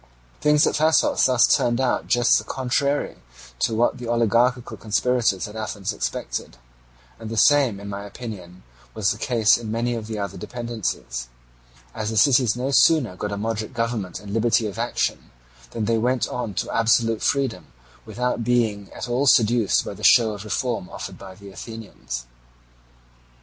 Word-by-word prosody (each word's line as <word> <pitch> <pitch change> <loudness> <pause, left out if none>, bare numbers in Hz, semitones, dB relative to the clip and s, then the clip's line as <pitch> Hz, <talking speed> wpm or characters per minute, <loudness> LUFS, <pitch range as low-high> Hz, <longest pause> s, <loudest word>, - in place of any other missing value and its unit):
Things 150 0 +4
at - - +1
Thasos 155 -2 +3
thus 125 -3 +4
turned 120 0 +2
out 130 -1 0
just 120 -1 +4
the - - -7
contrary 140 +3 -1 0.4
to 115 - +1
what 120 +2 +1
the 120 - -6
oligarchical 120 +2 +1
conspirators 115 -2 0
at 105 - -11
Athens 105 -1 -4
expected; - - -4 0.6
and 110 -1 -7
the 115 - -5
same 135 -6 +4
in 100 - -9
my 100 0 -5
opinion 100 -5 -9 0.3
was 105 -2 +1
the 105 - -5
case 115 -4 +3
in 110 -2 -6
many 120 +2 -1
of 115 -2 -5
the 110 -1 -5
other 100 -2 -5
dependencies; 115 - -4 0.7
as 110 0 -3
the 110 - -3
cities 125 -2 +4
no 130 +3 -2
sooner 135 - +4
got 105 +2 -4
a 100 - -3
moderate 110 +3 -3
government 115 -6 -2
and 100 0 -9
liberty 115 +1 +2
of 100 -3 -5
action, - - -2 0.4
than 110 - -3
they 115 +1 +1
went 125 +2 +1
on 115 -5 -4
to - - -3
absolute 115 0 +2
freedom 130 - -1 0.4
without 125 -1 -2
being 110 -4 0
at - - -6
all 125 +4 0
seduced 115 -3 +3
by - - -5
the - - -12
show 110 -2 +5
of 100 -1 -8
reform 110 -1 -2
offered - - -8
by 95 -1 -11
the 100 0 -12
Athenians. 105 - -8
115 Hz, 170 wpm, -23 LUFS, 105-125 Hz, 0.7 s, show